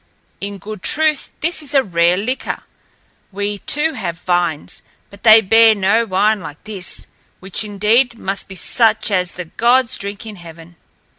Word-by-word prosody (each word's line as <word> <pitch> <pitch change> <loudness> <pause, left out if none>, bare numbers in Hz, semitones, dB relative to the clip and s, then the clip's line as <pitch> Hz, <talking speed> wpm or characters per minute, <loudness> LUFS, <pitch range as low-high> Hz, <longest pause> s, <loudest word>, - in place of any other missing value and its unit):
In 200 0 -5
good 210 +1 -9
truth 310 +3 +1
this 325 +1 0
is 290 -1 -4
a 270 - +5
rare 175 -2 +2
liquor. 245 +7 -3 0.7
We, 205 +1 -3
too, 310 +8 +1
have 180 - -4
vines, 175 -4 -1 0.3
but 200 0 -15
they 220 0 +8
bear 225 +2 +5
no 210 +4 +2
wine 205 +3 +2
like 160 -4 -10
this, 200 -4 -5 0.3
which 190 +3 -3
indeed 215 +4 +1
must 195 -2 -4
be 190 - -10
such 220 +2 +2
as 180 -2 0
the 180 - -7
gods 240 +7 +2
drink 200 +2 -6
in 215 -2 -8
heaven." 165 0 -13
205 Hz, 160 wpm, -18 LUFS, 185-230 Hz, 0.7 s, they